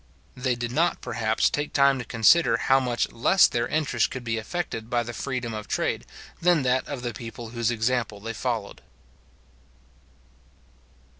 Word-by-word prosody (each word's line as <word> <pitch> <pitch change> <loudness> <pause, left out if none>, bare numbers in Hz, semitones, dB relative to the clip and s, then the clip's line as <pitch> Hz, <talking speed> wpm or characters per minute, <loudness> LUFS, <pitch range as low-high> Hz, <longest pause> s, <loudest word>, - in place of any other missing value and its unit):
They 125 -1 0
did 120 0 -4
not, 165 +6 +1
perhaps, 110 -1 0
take 145 0 -2
time 140 -1 +4
to 125 - -5
consider 115 +3 +4
how 135 +3 +3
much 125 -2 -1
less 175 +10 +4
their 120 0 -1
interest 155 -2 0
could 130 -1 -6
be 115 -1 -1
affected 115 -4 -4
by 120 -1 +1
the 120 +1 -7
freedom 125 -3 -3
of 105 -1 -6
trade, - - -2 0.3
than 170 -4 +3
that 130 0 +1
of 140 -4 -5
the 120 -1 -3
people 115 +1 -8
whose 115 0 -1
example 115 -2 -1
they 115 +3 -5
followed. 115 -3 -3
120 Hz, 160 wpm, -25 LUFS, 115-135 Hz, 0.3 s, time